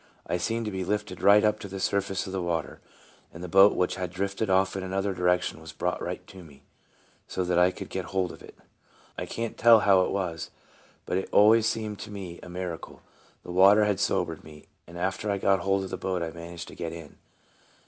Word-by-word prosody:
I 90 - -1
seemed 115 +6 -2
to 105 - -3
be 95 -1 -3
lifted 105 +3 -3
right 105 +1 +6
up 105 0 +2
to - - -7
the 95 0 -7
surface 100 0 -1
of 95 - -7
the 95 - -2
water, 85 -2 -3 0.5
and 85 - -10
the - - -4
boat 95 +3 +6
which 90 0 0
had 90 -1 -3
drifted 100 +3 -3
off 95 +1 +2
in 95 - -3
another 95 +1 -2
direction 90 -2 0
\vas 80 0 -11
brought - - -2
right - - -5
to 95 - -12
me, 70 -4 -17 0.6
so 95 - -2
that 90 -1 +1
I 90 +1 +5
could - - -8
get 95 -2 -4
hold 95 0 -1
of - - -13
it. - - -13 0.6
I - - -5
can't 115 -1 -5
tell 115 -2 +7
how 95 -2 +5
it - - 0
was, 90 -4 -3 0.6
but 90 - 0
it - - -6
always 110 +2 +6
seemed 110 -2 -3
to - - -8
me 95 -4 -7
a - - -11
miracle. 90 -2 -6 0.4
The - - -8
water 100 +4 +6
had 105 -2 0
sobered - - -1
me, 75 -1 -14 0.2
and 85 +1 -11
after 95 +4 -2
I 100 - +1
got 95 0 +2
hold 95 +2 0
of 95 - -7
the - - -3
boat 90 -2 -2
I 80 - -4
managed 85 +1 -9
to - - -12
get 85 -2 -5
in. 80 -3 -11
95 Hz, 230 wpm, -27 LUFS, 90-100 Hz, 0.6 s, tell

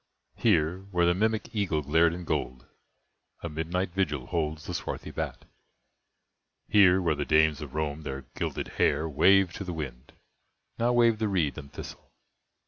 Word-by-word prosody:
Here, 90 -5 +2
where 90 -3 +2
the 85 - +4
mimic 110 +3 -1
eagle 90 -8 0
glared 80 +4 +3
in 90 +1 -6
gold, 65 -6 -3 0.8
A 85 - -3
midnight 85 +4 -2
vigil 75 -8 -1
holds 80 -3 -2
the - - -5
swarthy - - -5
bat! - - -5 1.2
Here, 95 -3 +6
where 85 -4 +1
the 75 -1 -2
dames 80 0 +3
of 75 -2 -8
Rome 75 0 -2
their 70 -3 -6
gilded - - -3
hair 80 - +2
Waved 95 +4 +4
to - - -5
the 90 -2 -5
wind, 65 -5 -7 0.7
now 120 +1 +2
wave 115 -2 +4
the 110 - +1
reed 85 -9 0
and 70 -2 -10
thistle! - - -10
80 Hz, 160 wpm, -28 LUFS, 75-95 Hz, 1.2 s, Here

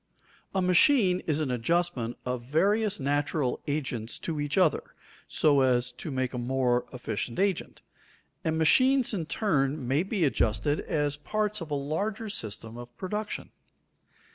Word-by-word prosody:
_ - - -38 0.3
A 190 - +2
machine 185 - +4
is 155 -1 +1
an 150 -5 -1
adjustment 125 -1 0
of 125 -1 -2
various 200 - +2
natural 145 -1 0
agents 130 -6 -3
to 160 -3 -2
each 145 +2 -2
other 175 -7 +2 0.3
so 145 -3 +3
as 125 -1 +2
to 140 +6 -7
make 130 -2 -2
a 125 - -3
more 125 0 +1
efficient 115 -2 -4
agent, 195 -2 -1 0.6
and 160 0 0
machines 255 - +4
in 170 -6 -2
turn 145 - 0
may 135 +5 +2
be 195 0 -1
adjusted 125 0 +1
as 145 -2 -1
parts 210 +5 -1
of 165 - -6
a 145 - -1
larger 200 +10 -2
system 110 - -5
of 120 0 -11
production. 210 +3 -4
145 Hz, 150 wpm, -28 LUFS, 125-185 Hz, 0.6 s, machine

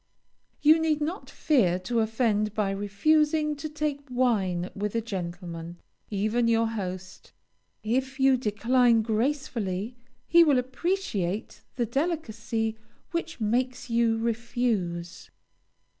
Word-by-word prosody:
You 310 +2 +7
need 315 -2 +1
not 330 +7 -4
fear 210 - +2
to 230 +6 -1
offend 220 -2 +1
by 205 -2 +1
refusing 300 +10 +2
to 310 +2 -5
take 300 -1 -2
wine 200 -8 0
with 205 +2 -3
a - - +3
gentleman, 175 -5 -6 0.3
even 215 +4 +1
your 230 0 +3
host. 185 -4 -6 0.5
If 260 +5 -1
you 270 0 +5
decline 235 0 +3
gracefully, 225 -3 -1 0.3
he 340 0 +6
will 290 -5 +4
appreciate 250 - -2
the 240 - 0
delicacy 230 -6 -2 0.3
which 335 -3 -3
makes 250 +3 -1
you 230 -1 +3
refuse. 225 -7 -2
230 Hz, 115 wpm, -27 LUFS, 205-270 Hz, 0.5 s, You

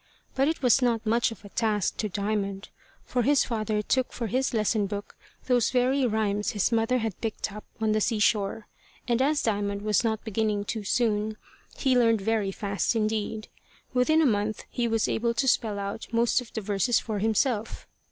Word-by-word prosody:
But 270 +1 +2
it 320 -2 -2
was 250 +1 +5
not 235 -2 +1
much 230 +2 +2
of 225 - -11
a - - -10
task 210 -2 0
to 215 - -2
Diamond, 200 0 -2 0.4
for 250 - 0
his 280 +3 +4
father 215 -3 -1
took 260 +3 0
for 235 - -4
his 255 +5 0
lesson 215 -2 +1
book 205 0 -6 0.3
those 245 -3 +2
very 255 +1 +2
rhymes 210 -2 0
his 205 +2 +1
mother 230 +2 +2
had 225 -5 -3
picked 220 -2 -3
up 210 - -9
on 220 -1 +1
the 215 0 +1
sea 225 +1 +1
shore; 210 0 +1 0.4
and 240 0 +1
as 295 +2 +2
Diamond 200 -2 -1
was 210 +1 +2
not 220 -2 -1
beginning 215 -1 0
too 220 0 -3
soon, 215 0 0 0.4
he 265 -2 +2
learned 230 -3 +4
very 215 -1 0
fast 200 +3 -1
indeed. 215 0 -1 0.5
Within 310 +6 +3
a - - +3
month 215 -3 0
he 240 -1 0
was 225 -1 +1
able 235 +1 0
to 270 - 0
spell 220 -4 +2
out 200 +2 -5
most 235 +2 +2
of 240 - -12
the 220 - -3
verses 205 +3 +1
for 215 -3 -2
himself. 220 +1 0
220 Hz, 190 wpm, -27 LUFS, 210-240 Hz, 0.5 s, was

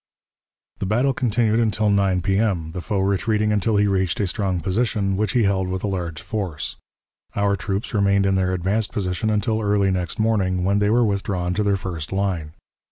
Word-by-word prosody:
The 95 - -2
battle 125 +7 +2
continued 115 -2 +1
until 110 -2 +1
9 100 -2 +2
P.M., 95 -4 0
the 90 +1 -5
foe 100 +1 -1
retreating 105 +2 +1
until 105 +1 +1
he 105 - +3
reached 95 -3 0
a 105 - +2
strong 95 -1 -1
position, 100 +1 0
which 105 0 -1
he 120 - +3
held 95 -2 +1
with 95 0 -3
a - - 0
large 85 -5 -4
force. 85 - -4 0.6
Our 100 0 +2
troops 100 +3 -3
remained 100 -1 +3
in 95 - +2
their 95 -1 +1
advanced 100 +4 -1
position 90 +1 -1
until 110 +1 0
early 100 -2 +2
next 90 -3 -2
morning, 95 -5 +1
when 100 +2 +2
they 105 0 +2
were 120 +2 +4
withdrawn 95 -3 -1
to 100 - 0
their 100 -1 +2
first 85 -5 -5
line. 95 -6 -2
100 Hz, 190 wpm, -22 LUFS, 95-105 Hz, 0.6 s, were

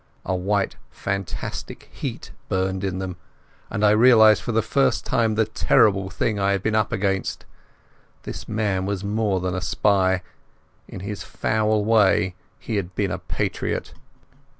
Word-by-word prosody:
A 95 - 0
white 100 +2 0
fanatic 100 -1 -5
heat - - -6 0.2
burned 95 0 -1
in 95 -2 -2
them, 95 -1 -5 0.5
and 105 +1 0
I 105 - +6
realized 110 -1 +6
for - - -3
the 115 -1 +1
first 135 +4 +1
time 110 -2 +1
the 110 0 +3
terrible 100 -3 +3
thing 105 +3 -1
I 100 0 +2
had 100 -1 -2
been 110 - 0
up 110 -1 +1
against. 100 -3 -1 0.8
This - - -7
man 100 -3 -1
was 100 -1 -2
more 105 -2 0
than 90 0 -2
a 90 - -2
spy; 95 -3 +2 0.6
in - - -8
his 100 +1 -5
foul 110 -1 0
way 100 -4 +3 0.2
he 110 - -3
had 90 -2 -4
been 100 -3 0
a - - -3
patriot. - - -3
100 Hz, 155 wpm, -23 LUFS, 95-110 Hz, 0.8 s, I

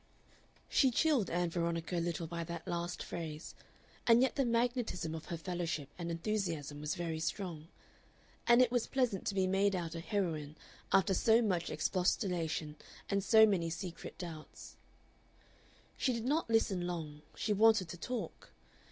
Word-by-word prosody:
She 265 - +4
chilled 255 - +2
Ann 175 0 0
Veronica 170 0 -1
a - - +1
little 170 0 -2
by 170 +1 -4
that 170 -1 -7
last 175 +1 -3
phrase, 160 -2 -6 0.5
and 235 +1 +7
yet 265 - +2
the 275 - +2
magnetism 235 -8 0
of 160 -1 -6
her 170 - -4
fellowship 165 -4 -3
and 170 -1 -5
enthusiasm 165 -5 -2
was 150 0 -2
very 165 -2 -3
strong; 165 -1 -3 0.8
and 240 +1 +7
it 245 - 0
was 245 -2 +1
pleasant 250 -8 0
to 200 - -1
be 190 -1 +3
made 195 +1 +2
out 170 -2 -3
a 165 - -4
heroine 165 -5 -2 0.4
after 195 +1 +4
so 220 +4 +4
much 180 -5 0
expostulation 170 -5 0 0.3
and 200 -1 +1
so 220 +1 +7
many 180 -6 +1
secret 170 +1 -6
doubts. 165 -4 -9 1.2
But - - -15
she 255 - +2
did 230 -1 -3
not 295 +1 +1
listen 195 -6 +2
long; 155 -4 -5
she 215 - 0
wanted 215 -3 +5
to 175 - -6
talk. 245 +6 -5
180 Hz, 160 wpm, -34 LUFS, 165-220 Hz, 1.2 s, and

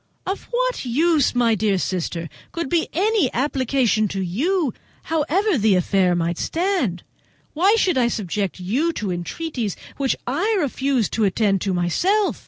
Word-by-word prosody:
"Of 385 +2 -3
what - - -1
use, 290 +3 +2
my 235 -2 +3
dear 210 -2 +1
sister, 175 -2 -2 0.2
could 335 -5 -3
be 335 +1 +1
any 390 - +2
application 255 -5 +1
to 195 0 -4
you, 275 - 0 0.3
however 325 - +1
the 210 -2 +4
affair 180 0 +2
might 170 0 -1
stand? 330 - -1 0.5
Why 380 +8 +4
should 365 -10 +2
I 240 - +3
subject 200 -4 -2
you 260 - 0
to 205 -9 -3
entreaties 215 - -3 0.2
which 275 -2 +1
I 385 - 0
refused 270 - 0
to 225 - +1
attend 195 -1 +2
to 195 - -1
myself? 365 - +1
250 Hz, 150 wpm, -22 LUFS, -, 0.5 s, the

